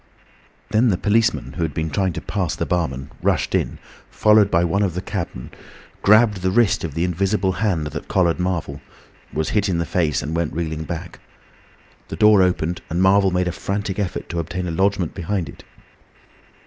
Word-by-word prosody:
Then 115 +4 +3
the 95 -6 +2
policeman, 110 +4 +1
who - - -3
had 80 -4 -2
been 80 -1 -2
trying 95 +2 0
to - - -5
pass 95 -6 -2
the - - -2
barman, 70 -7 -2
rushed - - 0
in, - - 0 0.3
followed 105 -2 +4
by 85 -2 +2
one 85 +4 +1
of 95 -5 0
the 90 - -2
cabmen, 85 - -5 0.5
gripped 105 -1 +4
the 95 - +1
wrist 110 +1 +2
of 80 -4 -5
the 85 - 0
invisible 95 +2 0
hand 95 -5 -1
that 75 0 -6
collared 90 -2 +1
Marvel, 85 -6 -2 0.5
was 80 +1 -2
hit 105 -2 +1
in 90 - 0
the 85 - -1
face 80 -7 0
and 80 +3 -3
went 85 -2 -1
reeling 80 -1 -3
back. - - -6 0.9
The - - -6
door 105 -2 +6
opened, 90 -2 0
and 85 - -1
Marvel 95 +1 +4
made 90 0 0
a - - 0
frantic 100 +2 -3
effort 95 -4 -3
to 85 - -3
obtain 90 +2 -3
a - - -2
lodgment 95 -1 0
behind 95 -1 -2
it. - - -12
90 Hz, 190 wpm, -21 LUFS, 80-100 Hz, 0.9 s, door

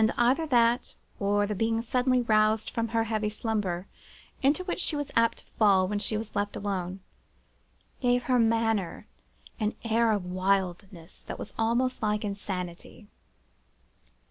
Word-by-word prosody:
And 220 - +5
either 260 +7 +3
that, 240 -2 +2 0.2
or 205 0 +2
the 210 - -2
being 225 +3 0
suddenly 250 +1 +2
roused 215 -1 +2
from 230 0 -1
the 225 0 +1
heavy 215 -1 -1
slumber 205 -5 -2 0.6
into 290 +6 +2
which 365 - -3
she 315 - +1
was 290 -1 -3
apt 230 0 +3
to - - -19
fall 195 -4 +5
when 205 +1 -1
she 215 +1 -2
was 220 0 -7
left 205 0 -1
alone, 190 -2 -3 1.0
gave 245 -1 +2
her 250 -1 +2
manner 225 -5 +1 0.5
an 215 0 -1
air 230 0 +2
of 205 -4 -1
wildness 185 -1 -2
that - - -5
was - - -7
almost 240 +3 0
like 210 0 0
insanity. 195 0 -6
215 Hz, 150 wpm, -28 LUFS, 200-235 Hz, 1.0 s, And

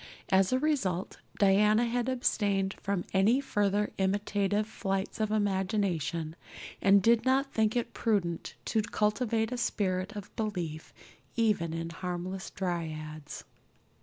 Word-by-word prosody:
As 190 0 +4
a 255 - +3
result 255 - -1 0.2
Diana 210 +3 +4
had 240 +1 -1
abstained 200 -6 +1
from 195 -2 -1
any 205 +7 +4
further 205 -5 0
imitative 205 +1 +1
flights 195 -2 -3
of 215 -1 +1
imagination 190 -6 0 0.5
and 195 0 +5
did 230 +1 +4
not 270 +1 +2
think 220 0 +2
it 240 - -1
prudent 185 -7 -1
to 220 - +1
cultivate 220 +2 0
a 250 - -2
spirit 195 -4 -1
of 205 -2 -8
belief 175 -8 -3 0.4
even 210 -8 +1
in 165 +1 -4
harmless 180 +2 -4
dryads. 155 -4 -4
200 Hz, 125 wpm, -30 LUFS, 185-220 Hz, 0.5 s, and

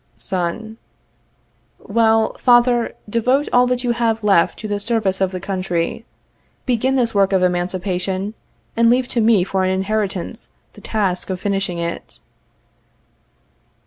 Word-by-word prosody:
Son. 200 +4 -4 1.0
Well, 220 +1 +2
father, 240 -1 +3
devote 250 +6 +1
all 245 0 +5
that 250 0 0
you 245 - +1
have 230 -2 0
left 195 -5 +3
to 215 - -6
the 205 -1 -2
service 205 -3 -1
of 190 - +2
the 185 - -5
country. 185 +1 -3 0.6
Begin 255 +1 +1
this 240 -3 +1
work 200 -1 +3
of 190 -1 +2
emancipation, 185 +2 -1 0.4
and 230 0 +4
leave 250 +1 +2
to 235 - +1
me 215 -4 +4
for 190 0 -1
an 185 - +1
inheritance 195 -1 -2 0.2
the - - -15
task 195 -5 -1
of 185 -1 -3
finishing 195 -3 -2
it. 170 0 -5
205 Hz, 140 wpm, -19 LUFS, 185-230 Hz, 1.0 s, all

